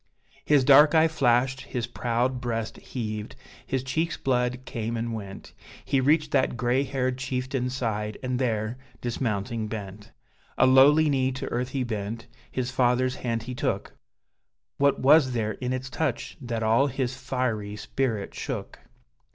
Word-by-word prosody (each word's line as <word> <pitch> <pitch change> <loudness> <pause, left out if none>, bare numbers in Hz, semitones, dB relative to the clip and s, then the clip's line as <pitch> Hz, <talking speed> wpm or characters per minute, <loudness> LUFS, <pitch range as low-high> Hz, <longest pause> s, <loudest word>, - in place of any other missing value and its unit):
His 145 -3 +4
dark 150 +4 +7
eye 160 0 +6
flashed, 135 -3 +2
his 120 -3 -3
proud 120 +1 -1
breast 115 -2 -3
heaved, 110 -3 -5 0.3
his 130 -1 -1
cheek's 160 +6 -1
blood 125 -1 0
came 115 -1 -3
and 115 0 -3
went, 100 -3 -8 0.3
He 135 -1 +2
reached 150 +2 +2
that 130 -3 +1
gray 120 +3 +2
haired 130 -2 -1
chieftain's 130 -1 -2
side, 105 -4 -2
and 125 -1 -1
there, 115 -1 -1 0.2
dismounting, 115 -2 -2
bent: 105 -1 -7 0.5
A - - +5
lowly 140 +4 +6
knee 130 -2 +1
to 130 - -5
earth 125 +1 -2
he 130 -1 -1
bent, 110 -1 -4 0.3
his 125 -1 -2
father's 125 0 +2
hand 115 -2 -2
he 125 - -6
took, - - -2 0.8
What 140 0 +4
was 135 -1 +5
there 110 -2 0
in 125 +2 -4
its 130 0 -3
touch 130 0 -2
that 115 -3 -3
all 115 +6 +4
his 130 -1 -2
fiery 125 -6 -2
spirit 110 -1 -2
shook? - - -5
125 Hz, 150 wpm, -26 LUFS, 115-130 Hz, 0.8 s, dark